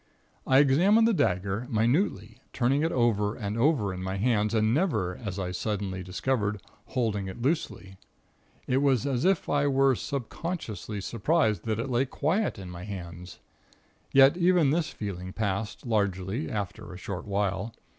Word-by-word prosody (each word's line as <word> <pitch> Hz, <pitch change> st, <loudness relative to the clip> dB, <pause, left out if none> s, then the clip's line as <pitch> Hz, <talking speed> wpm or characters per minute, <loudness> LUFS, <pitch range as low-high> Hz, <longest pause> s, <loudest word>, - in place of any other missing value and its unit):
"I 130 Hz, -, +5 dB
examined 180 Hz, +12 st, +5 dB
the 230 Hz, -, +3 dB
dagger, 100 Hz, -, 0 dB
minutely, 115 Hz, -, 0 dB
turning 135 Hz, +3 st, +2 dB
it 165 Hz, +1 st, +1 dB
over 105 Hz, -4 st, +1 dB
and 105 Hz, -2 st, -4 dB
over 115 Hz, -6 st, +2 dB
in 90 Hz, -, -6 dB
my 95 Hz, +1 st, -3 dB
hands 110 Hz, 0 st, +1 dB
and 110 Hz, 0 st, +2 dB
never 110 Hz, -, 0 dB
as 100 Hz, -3 st, -6 dB
I 90 Hz, -2 st, -3 dB
suddenly 95 Hz, -1 st, -3 dB
discovered 105 Hz, +3 st, -1 dB, 0.3 s
holding 110 Hz, -6 st, -1 dB
it 95 Hz, -, -7 dB
loosely. 125 Hz, -, -2 dB, 0.7 s
It 125 Hz, -, +1 dB
was 135 Hz, -3 st, +2 dB
as 135 Hz, +1 st, 0 dB
if 190 Hz, -2 st, +2 dB
I 145 Hz, 0 st, +2 dB
were 135 Hz, -1 st, +4 dB
subconsciously 125 Hz, -, -4 dB
surprised 115 Hz, -, 0 dB
that 110 Hz, -2 st, -1 dB
it 120 Hz, +3 st, -3 dB
lay 125 Hz, +2 st, +2 dB
quiet 170 Hz, -, 0 dB
in 95 Hz, -2 st, -8 dB
my 90 Hz, 0 st, -8 dB
hands. 90 Hz, -3 st, -8 dB, 0.7 s
Yet 135 Hz, +2 st, +7 dB
even 175 Hz, -5 st, +4 dB
this 160 Hz, 0 st, 0 dB
feeling 95 Hz, -3 st, -6 dB
passed, 105 Hz, +1 st, -3 dB
largely, 100 Hz, +2 st, -1 dB
after 100 Hz, -4 st, -5 dB
a 90 Hz, -, -8 dB
short 90 Hz, -2 st, -6 dB
while. 100 Hz, +1 st, -1 dB
110 Hz, 155 wpm, -28 LUFS, 100-135 Hz, 0.7 s, Yet